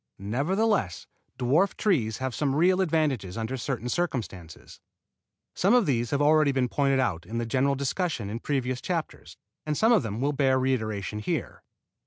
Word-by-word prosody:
Nevertheless 140 Hz, -, 0 dB, 0.3 s
dwarf 150 Hz, +11 st, +2 dB
trees 125 Hz, -, +1 dB
have 130 Hz, -1 st, -3 dB
some 135 Hz, +4 st, 0 dB
real 185 Hz, +4 st, +3 dB
advantages 145 Hz, -, 0 dB
under 115 Hz, +3 st, -3 dB
certain 125 Hz, -2 st, -3 dB
circumstances. 110 Hz, -, -4 dB, 0.7 s
Some 200 Hz, +6 st, +3 dB
of 245 Hz, -4 st, +4 dB
these 120 Hz, -5 st, 0 dB
have 140 Hz, +3 st, +1 dB
already 155 Hz, -1 st, +4 dB
been 130 Hz, -2 st, 0 dB
pointed 135 Hz, 0 st, +1 dB
out 90 Hz, -10 st, 0 dB
in 115 Hz, -, -4 dB
the 120 Hz, -, -1 dB
general 135 Hz, +4 st, +1 dB
discussion 140 Hz, -, -2 dB
in 110 Hz, +3 st, -4 dB
previous 130 Hz, -2 st, -2 dB
chapters, 170 Hz, -3 st, -4 dB, 0.3 s
and 150 Hz, -1 st, -2 dB
some 225 Hz, +2 st, +4 dB
of 235 Hz, -, +5 dB
them 110 Hz, -2 st, -4 dB
will 145 Hz, +3 st, 0 dB
bear 135 Hz, -2 st, +2 dB
reiteration 110 Hz, -6 st, -1 dB
here. 105 Hz, -, -3 dB
130 Hz, 165 wpm, -27 LUFS, 115-155 Hz, 0.7 s, of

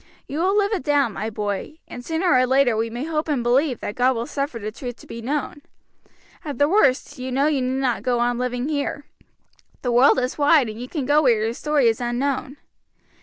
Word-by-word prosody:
You 290 Hz, -, -4 dB
will 380 Hz, +4 st, +2 dB
live 410 Hz, +1 st, +2 dB
it 400 Hz, -, -1 dB
down, 280 Hz, -5 st, +1 dB
my 215 Hz, +3 st, -4 dB
boy, 210 Hz, +7 st, -4 dB
and 245 Hz, -, -9 dB
sooner 330 Hz, +5 st, +1 dB
or 255 Hz, 0 st, +4 dB
later 260 Hz, -2 st, +3 dB
we 225 Hz, +1 st, -1 dB
may 240 Hz, +3 st, -5 dB
hope 310 Hz, 0 st, -2 dB
and 280 Hz, -6 st, 0 dB
believe 255 Hz, +2 st, +1 dB
that 205 Hz, -, -4 dB
God 255 Hz, +2 st, +2 dB
will 230 Hz, +1 st, -3 dB
suffer 275 Hz, -1 st, -3 dB
the 215 Hz, -1 st, -5 dB
truth 245 Hz, +2 st, -7 dB
to -, -, -16 dB
be 230 Hz, -, -8 dB
known. 290 Hz, +3 st, -3 dB, 0.8 s
At 290 Hz, -3 st, -5 dB
the 285 Hz, -, +3 dB
worst, 290 Hz, -8 st, +2 dB
you 255 Hz, +1 st, -5 dB
know 270 Hz, +3 st, +1 dB
you 295 Hz, -3 st, +1 dB
need 255 Hz, +1 st, -1 dB
not 250 Hz, -3 st, 0 dB
go 250 Hz, -1 st, 0 dB
on 240 Hz, 0 st, 0 dB
living 250 Hz, +1 st, -2 dB
here. 290 Hz, -1 st, -3 dB, 0.8 s
The 245 Hz, -, 0 dB
world 250 Hz, +4 st, +5 dB
is 255 Hz, +3 st, -2 dB
wide, 290 Hz, -4 st, +4 dB
and 215 Hz, +2 st, -8 dB
you 250 Hz, -, -6 dB
can 295 Hz, -6 st, -3 dB
go 295 Hz, +3 st, +4 dB
where 235 Hz, -6 st, +3 dB
your 225 Hz, +1 st, -1 dB
story 295 Hz, -1 st, +1 dB
is 225 Hz, +1 st, +1 dB
unknown. 265 Hz, +3 st, -2 dB
255 Hz, 225 wpm, -22 LUFS, 240-290 Hz, 0.8 s, world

